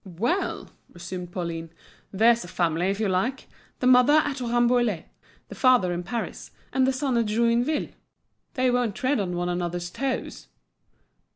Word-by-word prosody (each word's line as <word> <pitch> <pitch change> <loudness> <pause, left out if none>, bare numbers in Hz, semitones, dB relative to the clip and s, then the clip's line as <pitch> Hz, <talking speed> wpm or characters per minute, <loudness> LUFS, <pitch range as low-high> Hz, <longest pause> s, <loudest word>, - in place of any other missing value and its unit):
"Well!" 215 - -2 0.2
resumed 175 0 -7
Pauline, 165 -2 -4 0.4
"there's 230 +4 +4
a - - -9
family, 175 0 0
if 200 +1 -2
you 220 - +1
like! 225 +8 -1 0.3
the - - 0
mother 250 +2 +6
at 290 -3 +2
Rambouillet, 240 -5 +1 0.4
the - - -9
father 250 -9 +3
in 175 - -3
Paris; 220 +6 -5 0.2
and 265 -1 +3
the - - +3
son 260 -2 -1
at 230 - 0
Joinville; 235 +7 +1 0.7
they 255 -1 +2
won't 245 -5 0
tread 260 0 0
on 180 -3 -2
one 175 0 -2
another's 175 0 -3
toes!" 270 +4 -4
230 Hz, 155 wpm, -25 LUFS, 180-255 Hz, 0.7 s, mother